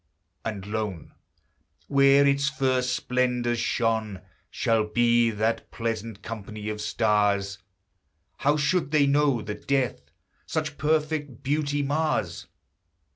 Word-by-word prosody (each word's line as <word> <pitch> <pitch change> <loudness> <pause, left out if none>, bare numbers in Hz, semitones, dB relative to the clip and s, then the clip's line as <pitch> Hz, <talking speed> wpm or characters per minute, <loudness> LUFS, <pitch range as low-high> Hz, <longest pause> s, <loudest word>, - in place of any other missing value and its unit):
And 105 -4 -4
lone, 105 -5 -4 0.7
Where 140 0 +5
its 140 0 +2
first 130 -4 0
splendors 125 -1 0
shone, 110 -5 -1 0.3
Shall 110 -2 +1
be 120 +1 +3
that 110 +1 -1
pleasant 115 -2 -4
company 105 -1 -6
of 105 0 -4
stars: 105 -2 +1 0.8
How 145 +2 +2
should 150 +1 +1
they 150 -1 +4
know 140 -4 +2
that 105 0 -7
death 125 - 0 0.4
Such 150 -2 -3
perfect 150 -3 -1
beauty 145 0 0
mars? 155 +3 -1
120 Hz, 110 wpm, -26 LUFS, 110-140 Hz, 0.8 s, Where